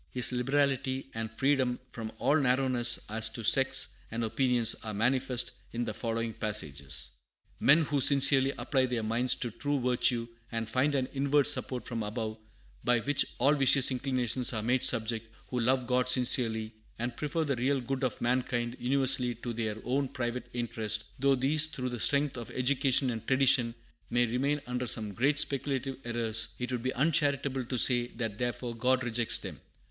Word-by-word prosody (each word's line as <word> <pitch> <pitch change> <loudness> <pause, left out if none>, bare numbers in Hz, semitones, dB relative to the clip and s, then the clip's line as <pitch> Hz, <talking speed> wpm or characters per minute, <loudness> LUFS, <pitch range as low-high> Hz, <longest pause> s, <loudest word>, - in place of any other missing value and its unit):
His 125 0 +1
liberality 135 +1 -1
and 115 0 -4
freedom 130 0 +1
from 110 -2 -6
"all 135 +6 +2
narrowness 130 -3 +2
as 110 +1 +1
to 115 0 -6
sects 135 +4 +4
and 115 +1 -3
opinions" 120 0 +3
are 110 -2 -5
manifest 125 +3 0 0.2
in 120 +1 -2
the 110 - -4
following 115 0 -3
passages: 70 - -2 0.5
"Men 150 +4 +5
who 145 -2 -1
sincerely 135 0 +5
apply 130 -3 0
their 120 -3 -2
minds 115 +3 +2
to 120 - -4
true 145 +5 -2
virtue, 125 -1 +1 0.2
and 115 -1 -3
find 130 +5 0
an 130 -2 0
inward 140 +1 +2
support 130 -3 +1
from 115 -2 -4
above, 110 +1 -4 0.4
by 120 0 +2
which 145 +2 +1
all 140 +4 +3
vicious 135 -1 +4
inclinations 125 -1 0
are 110 -1 -3
made 125 +2 +1
subject; 115 -1 0 0.2
who 125 - -2
love 125 +2 +1
God 125 +1 0
sincerely, 115 -3 +2 0.2
and 120 +1 -4
prefer 155 +2 -2
the 140 -3 -1
real 135 +3 +1
good 130 +2 -4
of 125 -4 -2
mankind 120 0 -1
universally 130 -1 +1
to 120 +1 -6
their 110 -2 -3
own 135 +3 -1
private 120 -1 -4
interest, 110 -3 -2 0.2
though 140 0 +3
these, 150 +5 +2
through 130 -4 -5
the 120 -1 -6
strength 140 0 +1
of 115 - -7
education 130 0 +2
and 115 -2 -7
tradition, 130 -3 +3 0.3
may 120 0 +2
remain 135 +5 -1
under 125 0 -3
some 110 -2 +1
great 140 +7 +1
speculative 135 -2 -1
errors, 115 -2 +1
it 125 0 -4
would 125 -2 -2
be 130 +2 -1
uncharitable 140 -2 +1
to 125 +1 -3
say 120 0 +4
that 115 -4 -5
therefore 120 0 -3
God 125 +3 +1
rejects 120 -1 +1
them. - - -8
125 Hz, 175 wpm, -29 LUFS, 115-135 Hz, 0.5 s, Men